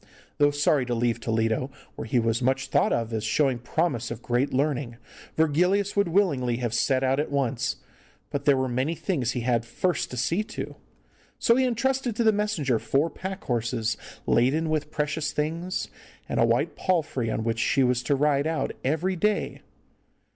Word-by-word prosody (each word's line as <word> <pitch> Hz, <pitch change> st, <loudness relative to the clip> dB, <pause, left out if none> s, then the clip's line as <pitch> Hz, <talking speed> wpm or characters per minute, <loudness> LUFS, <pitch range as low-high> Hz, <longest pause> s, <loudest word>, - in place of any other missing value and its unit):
Though 145 Hz, 0 st, +6 dB
sorry 145 Hz, -1 st, +2 dB
to 120 Hz, -, 0 dB
leave 115 Hz, 0 st, 0 dB
Toledo, 115 Hz, +2 st, 0 dB, 0.3 s
where -, -, -6 dB
he 125 Hz, -, +1 dB
was 115 Hz, 0 st, +1 dB
much 135 Hz, +2 st, 0 dB
thought -, -, +2 dB
of 115 Hz, -1 st, -1 dB
as 110 Hz, -1 st, -2 dB
showing 130 Hz, +3 st, +1 dB
promise 125 Hz, -1 st, -1 dB
of 115 Hz, -, -7 dB
great 125 Hz, +3 st, 0 dB
learning, 135 Hz, -3 st, -1 dB, 0.4 s
Virgilius 180 Hz, +6 st, +2 dB
would 200 Hz, -2 st, +3 dB
willingly 145 Hz, -10 st, +1 dB
have 120 Hz, -2 st, -2 dB
set 130 Hz, +2 st, +2 dB
out 135 Hz, +1 st, +2 dB
at 150 Hz, -, -1 dB
once, 140 Hz, 0 st, 0 dB, 0.6 s
but 140 Hz, -1 st, -3 dB
there 140 Hz, -2 st, +5 dB
were 130 Hz, 0 st, 0 dB
many 130 Hz, +6 st, -1 dB
things 140 Hz, -, -1 dB
he 125 Hz, -, -2 dB
had 120 Hz, -1 st, +1 dB
first 175 Hz, +10 st, -1 dB
to 125 Hz, -, -7 dB
see 170 Hz, -, +1 dB
to. 215 Hz, -, -6 dB, 0.6 s
So 235 Hz, -, +4 dB
he 260 Hz, +1 st, +3 dB
entrusted 255 Hz, 0 st, 0 dB
to 235 Hz, -, +1 dB
the 220 Hz, -, +5 dB
messenger 200 Hz, -, 0 dB
four 145 Hz, +8 st, +1 dB
pack 190 Hz, +1 st, -6 dB
horses 115 Hz, -2 st, -1 dB, 0.3 s
laden 150 Hz, +7 st, +2 dB
with 150 Hz, -1 st, -1 dB
precious 150 Hz, 0 st, -1 dB
things, 165 Hz, +5 st, -2 dB, 0.4 s
and -, -, -1 dB
a -, -, +5 dB
white -, -, +1 dB
palfrey 155 Hz, -, 0 dB
on 110 Hz, -, -2 dB
which 115 Hz, 0 st, -1 dB
she 135 Hz, +5 st, +2 dB
was 125 Hz, -1 st, +2 dB
to 140 Hz, +3 st, +1 dB
ride 145 Hz, +1 st, +2 dB
out 160 Hz, -1 st, -1 dB
every 160 Hz, +7 st, 0 dB
day. 210 Hz, +4 st, 0 dB
140 Hz, 185 wpm, -26 LUFS, 120-165 Hz, 0.6 s, Though